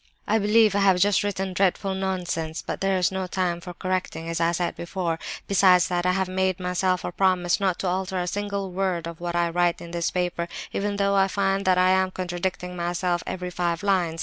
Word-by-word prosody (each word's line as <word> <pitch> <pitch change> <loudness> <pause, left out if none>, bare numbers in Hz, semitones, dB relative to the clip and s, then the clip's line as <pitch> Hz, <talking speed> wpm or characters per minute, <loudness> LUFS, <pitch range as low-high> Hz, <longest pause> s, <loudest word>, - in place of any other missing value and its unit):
"I 220 +1 +3
believe 215 0 +4
I 200 - +1
have 195 -2 +4
just 200 +1 +3
written 195 -2 -2
dreadful 195 +1 +1
nonsense; 180 -4 -3
but - - -4
there's 190 -2 +2
no 190 -1 -3
time 175 -2 -1
for 180 0 -8
correcting, 185 -3 -3
as 165 0 -2
I 165 0 +3
said 175 0 -1
before. 170 -2 -3 0.3
Besides 185 -2 +5
that, 175 0 0
I 180 - +3
have 190 0 0
made 185 0 0
myself 180 0 0
a - - -3
promise 180 -1 +2
not 190 -3 +1
to 190 - -1
alter 190 +1 -1
a 180 - -1
single 200 0 -3
word 180 -2 -1
of 170 0 -8
what 175 0 -3
I 170 0 +2
write 175 0 +1
in 170 - -9
this 170 -1 -1
paper, 175 -1 -2 0.3
even 205 0 -1
though 200 0 +1
I 195 -1 +4
find 195 0 0
that 185 -1 +4
I 185 0 +4
am 190 0 +3
contradicting 180 0 -4
myself 175 0 -1
every 180 -1 -4
five 175 -1 -1
lines. 180 -5 +1
185 Hz, 215 wpm, -25 LUFS, 175-195 Hz, 0.3 s, Besides